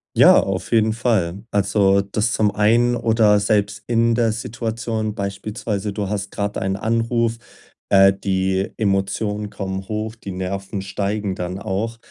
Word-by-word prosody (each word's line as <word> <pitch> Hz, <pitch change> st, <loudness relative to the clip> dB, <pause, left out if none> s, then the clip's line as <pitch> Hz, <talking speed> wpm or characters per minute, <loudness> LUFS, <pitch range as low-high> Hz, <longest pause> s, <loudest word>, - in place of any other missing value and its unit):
Ja, -, -, +7 dB
auf 95 Hz, -1 st, -4 dB
jeden 110 Hz, -1 st, +4 dB
Fall. 110 Hz, -4 st, -1 dB
Also, 100 Hz, -1 st, +3 dB
das 105 Hz, +3 st, -1 dB
zum 105 Hz, -1 st, +2 dB
einen 120 Hz, +4 st, +3 dB
oder 110 Hz, -3 st, +3 dB
selbst 105 Hz, 0 st, 0 dB
in 115 Hz, 0 st, +2 dB
der 115 Hz, -2 st, +2 dB
Situation, 110 Hz, -1 st, -3 dB
beispielsweise, 100 Hz, 0 st, -4 dB
du 100 Hz, -2 st, -3 dB
hast 100 Hz, -1 st, -3 dB
gerade 100 Hz, 0 st, -3 dB
einen 95 Hz, 0 st, -1 dB
Anruf, 115 Hz, +2 st, 0 dB, 0.5 s
äh, 95 Hz, 0 st, +6 dB
die 95 Hz, 0 st, -1 dB
Emotionen 105 Hz, +1 st, -1 dB
kommen 95 Hz, -1 st, -5 dB
hoch, 110 Hz, +1 st, -3 dB
die 100 Hz, -4 st, -8 dB
Nerven 95 Hz, +2 st, -4 dB
steigen 100 Hz, +1 st, -2 dB
dann 90 Hz, +1 st, -4 dB
auch. 110 Hz, +3 st, -3 dB
105 Hz, 145 wpm, -21 LUFS, 95-110 Hz, 0.5 s, Ja